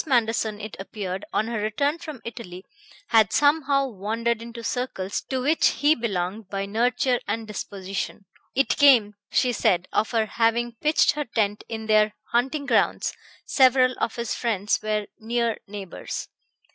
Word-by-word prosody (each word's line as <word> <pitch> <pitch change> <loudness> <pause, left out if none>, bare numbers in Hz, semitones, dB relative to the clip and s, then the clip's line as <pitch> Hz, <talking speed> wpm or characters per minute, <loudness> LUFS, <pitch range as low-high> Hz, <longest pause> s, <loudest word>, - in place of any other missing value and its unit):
Manderson, 225 -4 +1
it 215 0 -7
appeared, 195 -1 -5
on 215 - +1
her 230 -2 -2
return 280 +9 0
from 310 -7 -8
Italy, 190 -6 -8 0.4
had 225 -3 +5
somehow 285 -2 +3
wandered 225 +1 -2
into 235 0 -8
circles 225 -6 -2
to 260 -1 -1
which 310 +4 +3
he 295 +2 +3
belonged 200 - -3
by 195 0 -2
nurture 245 +4 +1
and 220 +2 -2
disposition. 195 -2 -5 0.3
It 270 -3 +2
came, 250 -8 +6 0.2
she 250 -1 +2
said, 180 -4 +2
of 220 - +1
her 225 -2 +1
having 235 +2 +1
pitched 305 +1 +4
her 295 0 -3
tent 210 -3 -1
in 220 -1 -5
their 215 -1 +3 0.2
hunting 265 +5 0
grounds; - - +1 0.3
several 255 -1 +4
of 225 - -1
his 235 -1 -2
friends 210 -4 0
were 215 -1 -1
near 235 0 0
neighbors. 200 -3 -6
225 Hz, 150 wpm, -25 LUFS, 210-250 Hz, 0.4 s, came